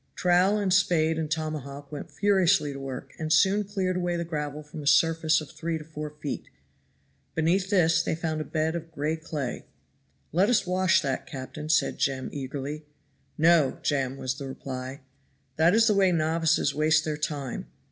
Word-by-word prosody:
Trowel 180 +3 +3
and 200 -3 +1
spade 165 -4 +3
and 155 -2 -2
tomahawk 150 -3 -4
went 150 +3 -7
furiously 190 -2 +2
to 135 - -7
work, 135 -1 -7
and 155 -1 -3
soon 200 +5 +4
cleared 190 -2 -2
away 175 -1 -1
the 170 0 -2
gravel 150 -2 -4
from 150 +1 -9
a 145 - -6
surface 160 0 +4
of 150 - -10
three 165 0 -3
or 155 - -5
four 150 -1 -6
feet. 150 -1 -6 0.9
Beneath 180 +4 +1
this 170 -5 +4
they - - -1
found 155 -1 -2
a - - -1
bed 160 +1 -1
of 165 -1 -6
gray 155 +1 -1
clay. 155 -5 -5 0.6
"Let 185 +7 +3
us 240 -5 +3
wash 185 -1 +2
that, 135 -2 -2
captain," 145 +3 -7
said 155 - +2
Jem 130 -1 0
eagerly. 145 +2 -5 0.5
"No! 160 -3 +4
Jem," 135 -2 0
was 130 +1 -3
the 140 - -5
reply; 130 0 -6 0.6
"that 165 +5 +4
is 225 0 +5
the 220 - +4
way 195 -2 +4
novices 160 -2 +2
waste 155 +2 +3
their 155 -1 -1
time. 145 -3 -4
155 Hz, 180 wpm, -27 LUFS, 145-175 Hz, 0.9 s, is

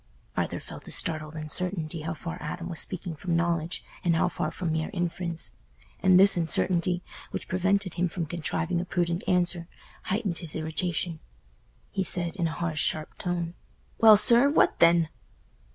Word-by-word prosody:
Arthur - - -1
felt - - -11
a - - -8
startled 155 -1 -2
uncertainty 160 +1 -2
how 160 +2 -3
far 165 +2 -6
Adam 170 +3 -5
was 170 -3 -1
speaking 180 -2 -1
from 170 +3 -2
knowledge, 170 0 0 0.2
and 170 -2 +3
how 165 - +3
far - - -2
from 175 -3 -3
mere 160 0 -1
inference. 170 -1 -2 0.5
And 185 -2 +6
this 195 +1 +7
uncertainty, 175 +1 +1 0.3
which - - -5
prevented 190 0 +1
him 180 +1 +1
from 170 0 -3
contriving 170 +1 -2
a - - -5
prudent 175 -1 -1
answer, 175 -2 +2 0.4
heightened 195 -3 -1
his 165 -4 -4
irritation. 160 +1 -2 0.7
He 190 - 0
said, 175 -1 +1
in 175 -4 0
a - - -3
high 170 -1 -2
sharp 155 0 0
tone, 175 -1 -2 0.5
"Well, 220 -2 +9
sir, 235 +6 +6
what 290 - +3
then?" 170 -1 +5
170 Hz, 165 wpm, -27 LUFS, 165-180 Hz, 0.7 s, Well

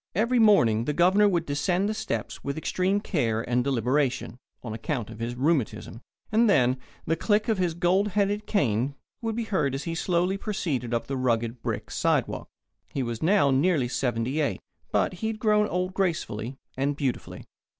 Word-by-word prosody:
Every 235 +5 +2
morning 120 - +5
the 150 - 0
Governor 190 +4 +5
would 170 -3 0
descend 175 +7 0
the 215 - -1
steps 115 - -4
with 140 +1 -3
extreme 185 +5 0
care 115 - -1
and 125 +1 +1
deliberation 130 -1 0 0.2
on 115 -3 -5
account 115 0 -3
of 110 - -10
his 120 +1 -3
rheumatism 130 -5 -1 0.3
and 225 +1 +4
then 130 -8 +4 0.3
the 165 - +1
click 210 +4 +1
of 220 -4 +1
his 175 -3 0
gold 180 +4 +2
headed 205 +1 0
cane 135 - +1 0.3
would 225 -2 -2
be 235 - -1
heard 170 - 0
as 135 - -4
he 165 - -3
slowly 180 +2 0
proceeded 150 - -2
up 115 -1 -1
the 135 +2 -3
rugged 120 -2 0
brick - - -4
sidewalk. - - 0 0.4
He 135 - -2
was 120 -2 -4
now 170 -4 +4
nearly 140 -1 +2
seventy 125 +2 -1
eight, 145 - -1 0.3
but - - +1
he 220 - 0
had 220 -1 -2
grown 210 -1 +3
old 180 0 -2
gracefully 140 - -2 0.2
and 140 +2 0
beautifully. 135 -3 -3
150 Hz, 180 wpm, -26 LUFS, 125-195 Hz, 0.4 s, morning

